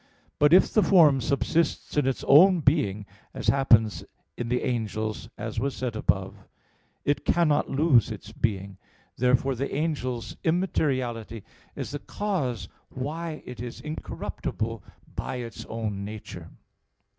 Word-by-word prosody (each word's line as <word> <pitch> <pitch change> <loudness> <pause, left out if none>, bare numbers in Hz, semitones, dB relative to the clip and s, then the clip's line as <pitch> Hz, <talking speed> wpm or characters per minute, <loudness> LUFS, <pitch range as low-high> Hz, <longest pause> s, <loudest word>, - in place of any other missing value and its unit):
But 150 0 +5
if 180 +2 +6
the 215 - +5
form 155 -10 +5
subsists 145 +5 0
in 145 -3 +2
its 135 - -1
own 180 +4 +7
being, 135 - +1 0.3
as - - 0
happens 115 -6 +3 0.3
in 120 -1 -4
the 125 +1 0
angels, 110 -3 -2
as - - -4
was 135 +3 -2
said 125 -3 -3
above 95 -3 0
(A. 100 - -18
2), - - -21 0.6
it 145 - +1
cannot 155 -4 +2
lose 135 -6 +4
its 105 -1 -8
being. 100 -4 -2 0.4
Therefore, 125 +2 +2
the 135 +3 -3
angel's 130 -7 -2
immateriality 130 - -1 0.3
is - - -5
the 145 - -4
cause 135 - -2 0.2
why 155 +4 -5
it 125 - -9
is 120 -1 -6
incorruptible 115 - -5 0.3
by - - -3
its 120 -2 -6
own 110 -3 -4
nature. 105 +1 -8
125 Hz, 140 wpm, -26 LUFS, 110-150 Hz, 0.6 s, own